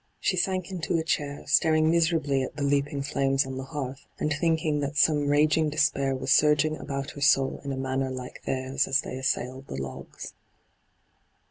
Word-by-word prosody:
She -, -, 0 dB
sank 185 Hz, 0 st, -1 dB
into 170 Hz, -2 st, -1 dB
a 160 Hz, -, -1 dB
chair, 145 Hz, -3 st, -2 dB
staring 155 Hz, +2 st, +3 dB
miserably 160 Hz, -5 st, +2 dB
at 130 Hz, -, -5 dB
the 145 Hz, -, -3 dB
leaping 140 Hz, 0 st, 0 dB
flames 135 Hz, 0 st, +1 dB
on 130 Hz, 0 st, -6 dB
the 130 Hz, -, -5 dB
hearth, 135 Hz, -1 st, -6 dB
and 150 Hz, -, 0 dB
thinking 160 Hz, 0 st, 0 dB
that 145 Hz, +1 st, -3 dB
some 145 Hz, -1 st, +3 dB
raging 155 Hz, +2 st, +3 dB
despair 140 Hz, -3 st, +1 dB
was 130 Hz, +2 st, +1 dB
surging 150 Hz, +1 st, +3 dB
about 140 Hz, -1 st, -5 dB
her 145 Hz, -, -10 dB
soul 135 Hz, -2 st, +3 dB
in 140 Hz, -, -4 dB
a 135 Hz, -, -3 dB
manner 130 Hz, 0 st, -1 dB
like 130 Hz, -1 st, -7 dB
theirs 130 Hz, +1 st, -1 dB
as 135 Hz, +2 st, +2 dB
they -, -, -7 dB
assailed 130 Hz, 0 st, -2 dB
the -, -, -6 dB
logs. 65 Hz, -1 st, -8 dB
145 Hz, 180 wpm, -27 LUFS, 135-155 Hz, -, staring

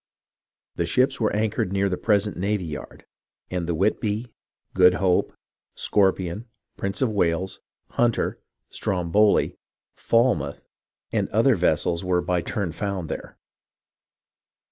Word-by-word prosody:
The -, -, 0 dB
ships 130 Hz, 0 st, +2 dB
were 110 Hz, -, +2 dB
anchored 105 Hz, -3 st, 0 dB
near 100 Hz, 0 st, +1 dB
the 95 Hz, -, -1 dB
present 105 Hz, 0 st, +1 dB
navy 100 Hz, 0 st, -1 dB
yard; 75 Hz, -2 st, -8 dB, 0.5 s
and 90 Hz, -2 st, -2 dB
the 85 Hz, -, 0 dB
Whitby, 105 Hz, +5 st, -1 dB, 0.4 s
Good 90 Hz, -1 st, +6 dB
Hope, 90 Hz, -2 st, +2 dB, 0.4 s
Scorpion, 95 Hz, +1 st, +1 dB, 0.3 s
Prince 100 Hz, +6 st, -1 dB
of 120 Hz, -, +1 dB
Wales, 90 Hz, -2 st, 0 dB, 0.3 s
Hunter, 120 Hz, -1 st, +1 dB, 0.3 s
Stromboli, 95 Hz, +3 st, +2 dB, 0.4 s
FahnoutJi, 115 Hz, -, +1 dB, 0.5 s
and -, -, 0 dB
other -, -, +4 dB
vessels 85 Hz, 0 st, +1 dB
were 90 Hz, -1 st, +1 dB
by 90 Hz, -1 st, 0 dB
turn 95 Hz, -1 st, -3 dB
found 95 Hz, -2 st, -4 dB
there. -, -, -6 dB
95 Hz, 120 wpm, -24 LUFS, 90-105 Hz, 0.5 s, Good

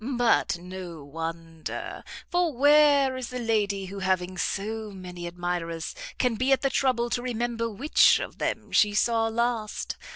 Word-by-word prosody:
but 240 Hz, -6 st, +2 dB
no 180 Hz, -3 st, -8 dB
wonder; 165 Hz, +2 st, -6 dB, 0.2 s
for 350 Hz, -2 st, +1 dB
where 285 Hz, -1 st, +5 dB
is 255 Hz, -2 st, -5 dB
the 250 Hz, -, -5 dB
lady 210 Hz, -4 st, 0 dB
who 195 Hz, +1 st, -7 dB
having 185 Hz, -1 st, 0 dB
so 215 Hz, +4 st, -2 dB
many 180 Hz, -3 st, -8 dB
admirers, 170 Hz, -2 st, -3 dB, 0.2 s
can 250 Hz, -2 st, +2 dB
be 255 Hz, +4 st, 0 dB
at 270 Hz, -, +3 dB
the 275 Hz, -, +2 dB
trouble 255 Hz, -3 st, +1 dB
to 245 Hz, +1 st, -1 dB
remember 235 Hz, -1 st, -2 dB
which 265 Hz, +8 st, +4 dB
of -, -, -7 dB
them -, -, -2 dB
she 210 Hz, -1 st, +4 dB
saw 225 Hz, +1 st, +2 dB
last? 230 Hz, -1 st, -2 dB
220 Hz, 155 wpm, -27 LUFS, 180-250 Hz, 0.2 s, where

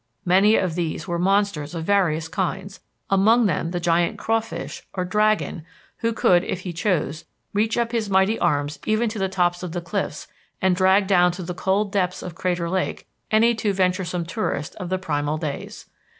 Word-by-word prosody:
Many 195 Hz, +4 st, +5 dB
of 185 Hz, -3 st, +1 dB
these 170 Hz, +2 st, -3 dB
were 170 Hz, -1 st, -2 dB
monsters 190 Hz, -4 st, +1 dB
of 165 Hz, -, -3 dB
various 165 Hz, -5 st, +1 dB
kinds, 180 Hz, -, -3 dB, 0.3 s
among 220 Hz, +5 st, +4 dB
them 165 Hz, -3 st, 0 dB
the 175 Hz, 0 st, -2 dB
giant 170 Hz, 0 st, +1 dB
crawfish 225 Hz, 0 st, -2 dB
(or 185 Hz, -1 st, -1 dB
dragon) 210 Hz, -3 st, +1 dB, 0.3 s
who 230 Hz, -, 0 dB
could, 180 Hz, -5 st, +3 dB
if 185 Hz, -, -3 dB
he 180 Hz, -1 st, -5 dB
chose, 165 Hz, -4 st, -1 dB, 0.3 s
reach 215 Hz, +3 st, +1 dB
up 235 Hz, -1 st, 0 dB
his 225 Hz, -4 st, -1 dB
mighty 190 Hz, +3 st, +3 dB
arms 145 Hz, +1 st, 0 dB
even 215 Hz, +2 st, +2 dB
to 215 Hz, 0 st, -5 dB
the 190 Hz, 0 st, 0 dB
tops 175 Hz, -2 st, +1 dB
of 180 Hz, -3 st, -5 dB
the 175 Hz, -, -2 dB
cliffs 195 Hz, +3 st, -4 dB, 0.3 s
and 190 Hz, -1 st, +2 dB
drag 190 Hz, +2 st, +4 dB
down 180 Hz, -2 st, +4 dB
to 180 Hz, +1 st, -6 dB
the 180 Hz, +1 st, -4 dB
cold 195 Hz, +3 st, 0 dB
depths 185 Hz, -3 st, -1 dB
of 180 Hz, -, -6 dB
Crater 180 Hz, -1 st, -1 dB
Lake 185 Hz, +2 st, -2 dB, 0.2 s
any 225 Hz, +2 st, +4 dB
too 220 Hz, -3 st, -1 dB
venturesome 180 Hz, -2 st, 0 dB
tourist 170 Hz, -5 st, -3 dB
of 180 Hz, -, -5 dB
the 185 Hz, -, 0 dB
primal 150 Hz, -4 st, -1 dB
days. 155 Hz, -3 st, -6 dB
185 Hz, 185 wpm, -23 LUFS, 170-205 Hz, 0.3 s, Many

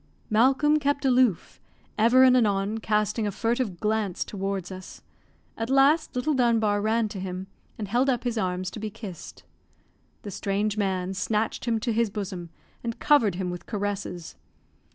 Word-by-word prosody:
Malcolm 270 Hz, +7 st, +4 dB
kept 285 Hz, -1 st, 0 dB
aloof, 250 Hz, -7 st, +2 dB, 0.3 s
ever 235 Hz, +4 st, +5 dB
and 255 Hz, -1 st, +6 dB
anon 210 Hz, -2 st, +1 dB
casting 215 Hz, 0 st, 0 dB
a -, -, -1 dB
furtive 230 Hz, -3 st, -1 dB
glance 215 Hz, -4 st, -1 dB
towards 195 Hz, -2 st, -4 dB
us; 185 Hz, 0 st, -10 dB, 0.5 s
at 225 Hz, +1 st, -4 dB
last 275 Hz, +3 st, +3 dB
little 250 Hz, +5 st, 0 dB
Dunbar 225 Hz, -5 st, +2 dB
ran 220 Hz, +1 st, +1 dB
to 205 Hz, -2 st, -6 dB
him, 185 Hz, 0 st, -5 dB, 0.3 s
and 210 Hz, -, -4 dB
held 245 Hz, +6 st, +2 dB
up 245 Hz, -2 st, 0 dB
his 240 Hz, -2 st, -1 dB
arms 185 Hz, -3 st, -2 dB
to -, -, -7 dB
be 215 Hz, 0 st, -4 dB
kissed. 195 Hz, -5 st, -10 dB, 0.8 s
The 205 Hz, -, -6 dB
strange 200 Hz, +2 st, -1 dB
man 190 Hz, -3 st, -1 dB
snatched 215 Hz, +4 st, -1 dB
him 230 Hz, -2 st, +1 dB
to 235 Hz, -1 st, -1 dB
his 230 Hz, 0 st, +1 dB
bosom, 190 Hz, -4 st, -5 dB, 0.3 s
and 230 Hz, -1 st, -3 dB
covered 230 Hz, -11 st, +3 dB
him 180 Hz, -1 st, -3 dB
with 175 Hz, -, -8 dB
caresses. 200 Hz, -5 st, -4 dB
215 Hz, 160 wpm, -26 LUFS, 195-240 Hz, 0.8 s, and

